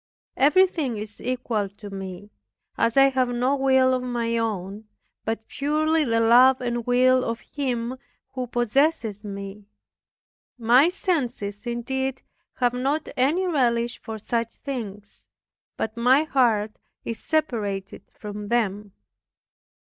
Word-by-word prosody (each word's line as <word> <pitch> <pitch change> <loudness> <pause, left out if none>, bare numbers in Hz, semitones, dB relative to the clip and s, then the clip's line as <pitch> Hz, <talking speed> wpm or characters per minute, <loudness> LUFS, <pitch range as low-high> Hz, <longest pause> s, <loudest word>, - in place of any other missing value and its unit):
Everything 300 - +3
is 210 0 -8
equal 240 -5 -2
to 205 +1 -11
me, 195 +1 -7 0.4
as 230 +2 +1
I 275 0 +7
have 260 -1 +1
no 250 +3 +1
will 265 -1 +3
of 255 - 0
my 240 -2 -2
own, 210 -2 -3 0.4
but 225 0 -3
purely 310 +2 +1
the 230 -4 +1
love 250 +3 +6
and 240 -1 -3
will 255 +1 +4
of 230 0 -3
Him 255 -3 -3 0.3
who 255 -1 -3
possesses 240 -2 0
me. 200 0 -7 0.9
My 250 +7 +5
senses 250 - -2
indeed 265 +2 -3 0.3
have 245 -1 +1
not 275 +5 -1
any 300 +9 +2
relish 240 -8 +1
for 220 -1 -6
such 230 +2 -2
things, 210 -7 -7 0.5
but 220 0 -3
my 250 +5 +4
heart 230 -8 +2 0.3
is 230 -2 -4
separated 215 -11 -2
from 210 -1 -7
them. 210 -3 -1
240 Hz, 125 wpm, -24 LUFS, 215-265 Hz, 0.9 s, I